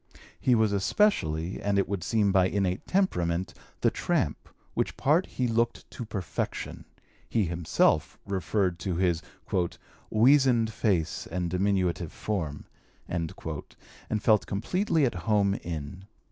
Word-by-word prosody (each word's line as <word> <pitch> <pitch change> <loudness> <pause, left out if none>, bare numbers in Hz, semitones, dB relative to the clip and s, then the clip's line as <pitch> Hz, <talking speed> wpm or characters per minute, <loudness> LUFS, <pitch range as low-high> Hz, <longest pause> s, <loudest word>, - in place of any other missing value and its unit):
He 125 -2 +3
was 110 -2 +3
especially, 95 - +1
and 100 -1 +1
it 100 - +2
would 100 -3 -3
seem 105 -3 +2
by 95 -1 +4
innate 95 -1 -1
temperament, 90 - 0 0.3
the - - +4
tramp, - - -1 0.2
which - - -1
part 155 +6 +3
he 125 - -1
looked 115 0 0
to 120 - -6
perfection 100 -6 -4 0.4
(he 110 -4 +2
himself 85 -1 +1
referred 95 -2 0
to 95 -4 -2
his 85 -2 +1 0.9
"weasoned 120 -1 +4
face 95 -9 0
and 85 0 -2
diminutive 90 -3 0
form") 80 -9 -3 0.4
and 85 -2 -2 0.9
felt 105 -2 +3
completely 160 - +1
at 120 - 0
home 100 +2 +2
in. 85 0 -6
100 Hz, 125 wpm, -28 LUFS, 85-115 Hz, 0.9 s, by